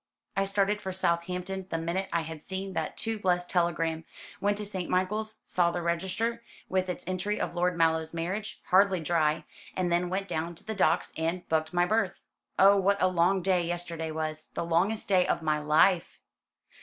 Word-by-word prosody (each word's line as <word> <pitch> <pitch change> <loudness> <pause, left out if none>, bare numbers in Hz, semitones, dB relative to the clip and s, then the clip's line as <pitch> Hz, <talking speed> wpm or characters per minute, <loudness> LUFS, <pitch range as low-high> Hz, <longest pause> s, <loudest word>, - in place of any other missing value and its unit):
I 195 - +2
started 200 +1 +1
for 190 - -4
Southampton 180 +1 -1
the 165 - -1
minute 170 +4 -2
I 170 - +1
had 160 -1 -7
seen 190 +2 -5
that - - -3
too 225 -1 -2
blessed 180 -2 0
telegram; 165 -2 0 0.4
went 205 0 +1
to 210 - -2
St. 190 -3 -3
Michael's, 215 +4 -1
saw 175 -1 +3
the 175 0 -3
register 190 +7 -1 0.3
with 185 0 0
its 180 - -4
entry 185 +3 -2
of - - -2
Lord 180 0 0
Mallow's 160 -1 +2
marriage, 185 +6 -4
hardly 190 0 +5
dry; 160 -1 +1 0.3
and 180 -2 0
then 175 +1 +1
went 195 +2 -2
down 170 0 -3
to - - -12
the 220 - -4
docks 200 - +2
and 165 +3 -2
booked 160 0 +1
my 175 0 +3
berth. 200 -2 0 0.4
Oh, 200 +1 +7
what 200 +1 +2
a - - +3
long 185 +1 +2
day 185 -1 +3
yesterday 170 -1 -3
was 155 0 -3
the - - -2
longest 180 +7 +1
day 185 -3 +3
of - - 0
my 155 -1 +1
life!" 160 +4 +3
180 Hz, 190 wpm, -29 LUFS, 165-195 Hz, 0.4 s, Oh